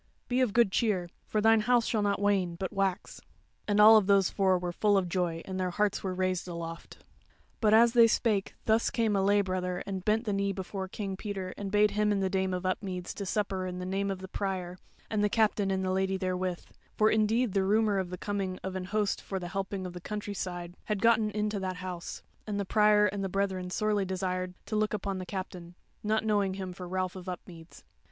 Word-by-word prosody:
Be 255 +1 +1
of 250 -5 +2
good 235 -4 +4
cheer; 190 -6 0 0.2
for 215 - 0
thine 225 +1 +5
house 240 +1 +3
shall 220 - 0
not 200 -1 +1
wane, 195 -4 +1
but 190 +3 -4
wax." 195 -1 -2 0.5
And 205 0 +2
all 215 +1 +9
those 195 -1 +3
four 190 -2 +3
were 175 0 -3
full 205 +3 +2
of 185 -2 +1
joy 170 -2 -1
and 190 0 -4
their 185 -1 0
hearts 205 +2 0
were 185 -2 -2
raised 185 -1 -1
aloft. 170 -1 -7 0.6
But 215 -1 +4
as 235 +1 +6
they 235 -2 +7
spake 215 -3 0
thus 220 +1 +3
came 225 -3 +1
a 195 - +2
lay 205 +1 +4
brother 180 -1 -2
and 190 -2 -4
bent 220 +3 +1
the 210 - -1
knee 200 0 0
before 190 0 -5
King 195 0 -4
Peter 195 -3 -5
and 200 -1 -5
bade 210 0 +4
him 210 0 +1
and 205 - +1
the 190 - 0
Dame 190 -1 0
of 180 0 -3
Upmeads 185 -1 -3
to 200 - -5
supper 190 -2 -1
in 180 0 -5
the 180 - -5
name 195 +2 -1
of 195 - -2
the 190 0 -8
Prior, 185 -2 -4 0.3
and 210 -1 0
the 210 - +3
Captain 210 -2 +2
and 190 0 0
the 185 - 0
Lady 190 0 0
therewith; 185 -1 -2 0.3
for 215 0 +4
indeed 220 +1 +2
the 195 - +2
rumour 210 0 +2
of 185 -2 -3
the 180 - -5
coming 195 -2 -3
of 190 0 -4
an 185 -1 -3
host 205 +1 -1
for 195 - -4
the 175 -2 -5
helping 195 0 -3
of 180 - -6
the 180 - -8
countryside 185 -4 -5
had 210 -2 -1
gotten 225 -2 +4
into 210 0 -2
that 185 -1 -3
House, 180 -1 -6 0.2
and 205 -1 -2
the 200 - -1
Prior 210 +1 +4
and 200 -1 -1
the 195 - -2
brethern 190 -1 -1
sorely 210 +1 0
desired 185 -1 -3
to 215 - -4
look 215 0 +1
upon 195 -2 -3
the 185 - -7
Captain, 180 -3 -6 0.3
not 215 +1 0
knowing 205 -3 +1
him 190 -2 -5
for 180 0 -8
Ralph 185 0 -2
of 185 -1 -7
Upmeads. 170 -2 -10
195 Hz, 225 wpm, -29 LUFS, 185-210 Hz, 0.6 s, all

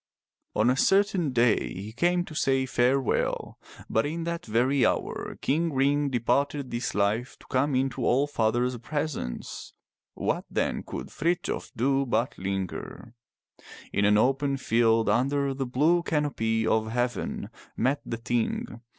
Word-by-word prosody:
On 115 +3 +4
a - - +1
certain 195 0 +3
day 120 -6 +2
he 100 +4 -7
came 175 +7 +1
to 160 - -10
say 135 -3 +1
farewell, 130 0 0 0.3
but 110 - +1
in 165 +3 -3
that 170 0 -3
very 125 +5 +2
hour. - - -1
King 165 +4 +1
Ring 140 +1 +2
departed 140 +2 0
this 120 +1 -3
life 105 +5 0
to - - -19
come 135 +1 +2
into 130 0 0
All 135 +4 +3
father's 120 -2 0
pres 150 +4 -2
ence. 60 - -6 0.4
What, - - -1
then, - - -1
could - - -7
Frithjof 170 +4 -2
do 135 +3 +2
but 120 +1 0
linger? 95 +4 -4 0.8
In 100 - +2
an 105 0 +5
open 135 +4 +2
field 115 -3 +2
under 135 +5 +1
the 135 -1 -3
blue 155 +8 +3
canopy 130 -9 0
of 110 0 +1
heaven 120 +1 -2 0.3
met 135 +3 +1
the 115 - -4
Ting. 115 0 -2
130 Hz, 145 wpm, -27 LUFS, 115-145 Hz, 0.8 s, an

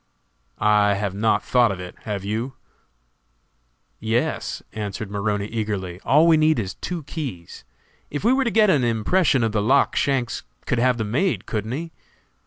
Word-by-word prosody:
"I 105 -1 +3
have 100 -1 -2
not 105 +1 +1
thought 120 -3 +3
of 95 - -5
it, 90 -1 -7
have 100 -2 -4
you?" 115 +6 -2 1.5
"Yes," 110 +2 -1
answered 105 0 -5
Maroney, 100 0 -1
eagerly; 105 -5 -3
"all 150 +4 +5
we 165 -1 +6
need 155 0 +3
is 95 -5 -2
two 175 -3 -5
keys. 130 - -7 0.5
If 145 - -4
we 235 +4 +4
were 270 +1 +2
to - - +2
get 215 -3 +4
an 140 -7 +2
impression 125 - +2
of 115 - +1
the 105 -1 0
lock 135 +7 +3
Shanks 130 -4 0 0.2
could 125 - 0
have 125 0 +3
them 110 -2 -3
made, 180 - 0
couldn't 110 +1 -3
he?" 165 +4 -5
115 Hz, 170 wpm, -23 LUFS, 105-145 Hz, 1.5 s, we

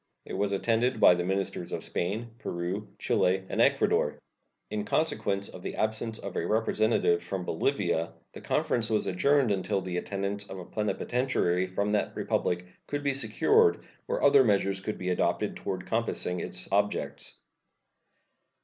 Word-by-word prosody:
It - - -8
was 100 0 0
attended 115 +5 +1
by - - +8
the 90 0 -1
ministers 95 -1 -2
of - - -3
Spain, 110 +7 -3
Peru, 90 +5 -3
Chile, 95 +1 +1
and - - 0
Ecuador. - - +3 0.5
In 105 -1 -1
consequence 100 -7 0
of 90 - -10
the - - -5
absence 110 +1 -1
of 100 -4 -7
a - - 0
representative 110 -5 +2
from 90 +1 -4
Bolivia, 85 - 0 0.2
the - - -9
conference 115 -2 +1
was 110 -1 +1
adjourned 135 +6 +3
until 100 +1 0
the 90 -1 -4
attendance 100 +2 -3
of 95 - -6
a 90 - -7
plenipotentiary 105 -3 0
from 100 +3 -1
that 105 - 0
Republic 90 0 -1 0.2
could 145 0 -3
be 140 -1 +1
secured 435 - +3 0.2
or - - -1
other - - +7
measures 100 -3 +2
could 105 +3 -4
be 90 - -3
adopted 90 - 0
toward - - -4
compassing 90 0 -1
its - - -3
objects. 100 +1 -1
100 Hz, 155 wpm, -29 LUFS, 90-115 Hz, 0.5 s, by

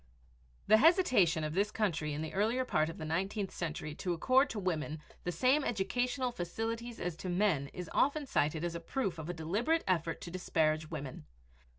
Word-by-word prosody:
The 215 - +6
hesitation 250 - +4
of 155 0 -2
this 200 +4 +2
country 175 -8 -1
in 150 +2 -3
the 160 - -5
earlier 225 +6 +1
part 155 -9 +1
of 165 - -7
the 155 - -5
nineteenth 195 +5 -1
century 155 -2 -4
to 180 - -1
accord 255 - +3
to 225 - -5
women 160 -5 -2 0.3
the 175 - 0
same 265 - +3
educational 245 +5 0
facilities 225 +5 -4
as 175 -2 -3
to 185 - -5
men 175 -6 +2
is 180 +4 -7
often 285 +2 +2
cited 155 - 0
as 175 -1 -1
a 170 - -4
proof 185 -1 -2
of 160 +1 -6
a - - -1
deliberate 210 - 0
effort 170 -3 0
to 170 - -7
disparage 155 -3 0
women. 140 - -6
180 Hz, 190 wpm, -33 LUFS, 160-230 Hz, 0.3 s, The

